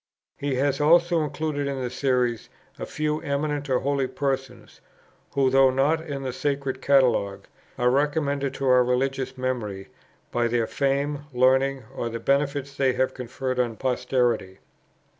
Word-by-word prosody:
He 140 -1 -2
has 140 +2 0
also 170 +2 +4
included 150 -1 -2
in 140 -1 -3
the 125 -2 -3
Series 125 -4 0 0.3
a - - -5
few 155 0 -2
eminent 145 -1 -2
or 130 - +3
holy 140 -1 0
persons, 135 -1 -4 0.5
who, 135 -2 +3
though 135 0 +6
not 140 +5 +2
in 140 -4 -5
the 130 -1 -3
Sacred 140 -1 -2
Catalogue, 110 -8 +2 0.3
are 125 -1 +3
recommended 140 0 0
to 135 - -3
our 125 -1 +6
religious 130 +1 -1
memory 115 -7 -3 0.4
by 120 0 +1
their 120 -1 +1
fame, 140 +3 -1
learning, 130 +1 +2
or 120 - -2
the 115 0 -5
benefits 140 +1 0
they 135 -2 +2
have 130 +1 0
conferred 130 +1 -4
on 120 -2 0
posterity. 120 -6 0
135 Hz, 150 wpm, -25 LUFS, 125-140 Hz, 0.5 s, though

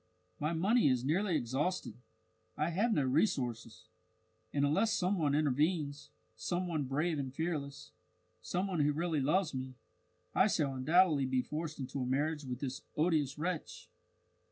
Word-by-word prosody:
My 150 +2 0
money 200 +6 +3
is 130 -1 +1
nearly 175 +5 +1
exhausted, 140 - -1 0.6
I 155 +3 0
have 210 +8 +1
no 150 -10 +2
resources, 130 - 0 0.7
and 140 0 +2
unless 195 +10 +2
some 190 -1 +1
one 145 -3 +2
intervenes, 145 0 0 0.3
some 180 +1 -2
one 155 -5 -1
brave 150 +4 0
and 135 -2 -3
fearless, 145 -2 -4 0.5
some 180 - -1
one 185 -4 -2
who 145 0 +3
really 160 -1 0
loves 155 +4 +1
me, 130 0 -5 0.6
I 190 - +5
shall 150 -9 0
undoubtedly 150 +1 +3
be 130 -1 +1
forced 155 0 -4
into 135 +1 -4
a - - -1
marriage 145 +3 0
with 125 -1 -5
this 130 -2 -4 0.2
odious 155 -4 +1
wretch. 170 +1 -4
150 Hz, 155 wpm, -33 LUFS, 135-175 Hz, 0.7 s, I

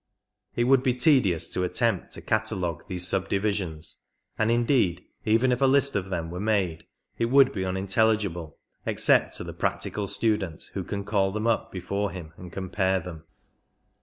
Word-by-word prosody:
It 120 - +2
would 130 +1 +4
be 130 -2 +1
tedious 125 - +3
to 90 - -1
attempt 110 +1 0
to - - -6
catalogue 105 -7 -1
these 90 -3 -2
subdivisions, 95 -4 -2 0.4
and 110 - +1
indeed 115 -7 +2 0.2
even 115 +4 +3
if 125 +1 0
a 135 - +5
list 140 +1 +4
of 95 -1 -1
them 85 -3 -3
were 90 - -5
made 100 -6 0 0.3
it 115 - +2
would 135 +2 +5
be 95 -7 -3
unintelligible 95 -3 0 0.3
except - - +3
to - - -4
the - - -7
practical 105 -1 -2
student 105 -7 0
who - - -3
can 100 0 -4
call 100 -2 +1
them 110 +2 -3
up 115 -1 0
before 100 +2 -2
him 85 -4 -9
and 90 0 -11
compare 95 +1 0
them. 80 -2 -9
100 Hz, 165 wpm, -26 LUFS, 90-115 Hz, 0.4 s, a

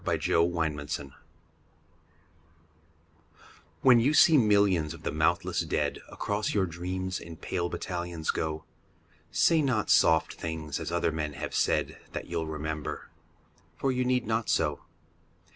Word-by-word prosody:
XCI - - -1
The - - +1 0.2
Army 80 -3 -1
of 75 - -10
Death 70 -1 -3 2.8
WHEN 125 -3 +7
you 140 +6 +2
see 165 0 +7
millions 100 - +3
of 85 - -15
the - - -2
mouthless 75 +1 +1
dead - - -1
Across 105 +1 -2
your 100 -2 +3
dreams 90 +2 -4
in 85 -1 -10
pale 85 +1 -2
battalions 85 -3 -3
go, 80 0 -3 0.7
Say 165 -2 +3
not 125 -7 +1
soft 80 -1 +4
things 80 -3 -5
as - - -5
other 85 -1 +1
men 75 -1 -3
have 70 - -5
said, - - 0
That - - -4
you'll 80 -1 -3
remember. 80 -1 -5 0.7
For 135 - 0
you 125 0 0
need 125 0 +1
not 110 +1 -1
so. 75 -3 +1
85 Hz, 145 wpm, -28 LUFS, 80-105 Hz, 2.8 s, WHEN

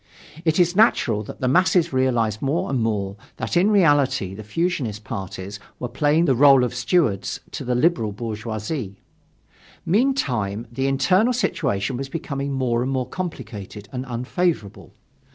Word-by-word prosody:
It 160 +1 +2
is 175 0 +3
natural 125 - +3
that - - -10
the 130 - +1
masses 175 +2 +3
realized 120 -5 +1
more 140 +2 -1
and 130 -3 0
more 100 -3 -1 0.2
that - - -3
in 180 +4 +4
reality 145 - +3
the 110 +2 -8
fusionist 125 - -2
parties 100 -1 -6 0.2
were 125 - -4
playing 150 +5 +2
the 135 - +3
role 135 0 +6
of 125 - -1
stewards 125 - 0
to - - -5
the 125 0 -1
liberal 125 -5 +2
bourgeoisie. 110 0 -5 0.9
Meantime, 130 - 0
the 135 +3 -1
internal 185 - +3
situation 135 - -1
was 135 +1 -5
becoming 140 -3 -4
more 125 -3 0
and 130 +2 -1
more 130 -2 -1
complicated 105 - -7
and 125 -1 -4
unfavorable. 125 - -2
130 Hz, 150 wpm, -22 LUFS, 110-165 Hz, 0.9 s, role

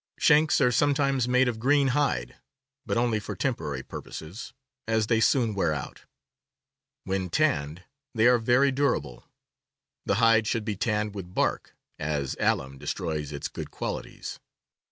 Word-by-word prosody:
Shanks 155 0 +4
are 125 - +4
sometimes 135 -1 +2
made 125 +1 +3
of 115 -2 -2
green 140 +3 +3
hide, 125 - 0 0.5
but - - 0
only 115 -2 +1
for 105 - -6
temporary 75 - -2
purposes, 90 +10 -8 0.4
as 110 -1 +2
they 110 +1 +2
soon 115 -1 +2
wear 85 -6 0
out; - - -7 1.0
when 95 -1 -2
tanned 75 +1 0 0.3
they 110 0 +3
are 120 0 +6
very 125 +4 +3
durable. 125 - -1 0.8
The - - +2
hide 115 -1 +4
should 115 -2 -1
be 105 -2 -2
tanned 105 0 -1
with 95 -3 -8
bark, - - -1 0.2
as 75 -3 -2
alum 65 +1 0
destroys 75 -3 -3
its 70 -1 -4
good - - -7
qualities. - - -6
110 Hz, 145 wpm, -27 LUFS, 85-125 Hz, 1.0 s, are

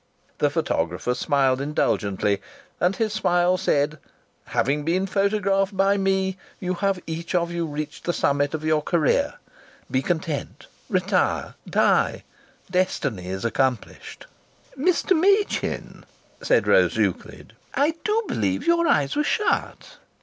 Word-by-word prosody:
The - - +3
photographer 90 +9 -1
smiled 135 0 +1
indulgently, 105 -8 0 0.4
and 180 +2 +2
his 215 0 -1
smile 175 -3 +2
said: 150 -5 0 0.5
"Having 145 +2 0
been 180 +5 +1
photographed 195 0 +1
by 195 +1 +3
me, 190 -1 0 0.2
you 185 -1 -2
have 195 0 0
each 165 +2 -4
of 170 -1 +1
you 170 -1 -2
reached 150 0 -6
the 175 - +1
summit 145 -2 +1
of 155 - -6
your 155 -1 +2
career. 160 0 +1 0.6
Be 130 - +2
content. 160 -1 -3 0.2
Retire! - - 0 0.2
Die! - - +2 0.5
Destiny 180 - -1
is 95 +4 -4
accomplished." 125 0 -2 0.5
"Mr. 360 +6 +2
Machin," 395 +5 0 0.4
said - - +2
Rose - - +3
Euclid, - - -2 0.2
"I 295 +3 +2
do 435 +2 +1
believe - - -1
your 335 0 +3
eyes 140 -2 +2
were 300 - +2
shut!" 420 +7 -1
175 Hz, 130 wpm, -24 LUFS, 145-200 Hz, 0.6 s, The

